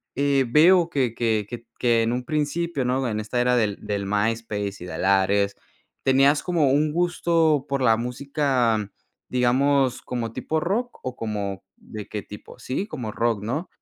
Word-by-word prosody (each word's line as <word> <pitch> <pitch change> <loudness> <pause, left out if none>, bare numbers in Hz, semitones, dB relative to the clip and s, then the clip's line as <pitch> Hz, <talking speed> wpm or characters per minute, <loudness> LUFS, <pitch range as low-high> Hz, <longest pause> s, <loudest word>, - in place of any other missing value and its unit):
eh, 140 0 +2
veo 170 +5 +5
que 130 -7 0
que 110 -3 0
que 120 -1 -8
que 120 -2 +3
en 115 - 0
un 125 +1 -3
principio, 155 0 -1
¿no? 130 +1 0
En 110 -2 -2
esta 110 +3 -3
era 125 0 +3
del 105 -4 +1
del 100 -1 -3
MySpace 105 -1 -2
y - - -7
del 90 - -4
Ares, 100 +1 +2 0.5
tenías 135 +2 +4
como 165 -7 +2
un 150 +2 +2
gusto 165 -3 +1
por 140 -1 -1
la 115 -3 +4
música, 125 -3 0 0.4
digamos, 130 +1 +2
¿como 120 -3 -4
tipo 160 +6 -2
rock 215 +9 -2
o 130 -1 -4
como 100 -4 -4
de 105 -2 -9
qué 105 - -4
tipo?, 105 - -12
sí, 160 +11 -3
como 125 - -5
rock, 115 -2 -1
¿no? 145 - -3
125 Hz, 170 wpm, -24 LUFS, 110-145 Hz, 0.5 s, veo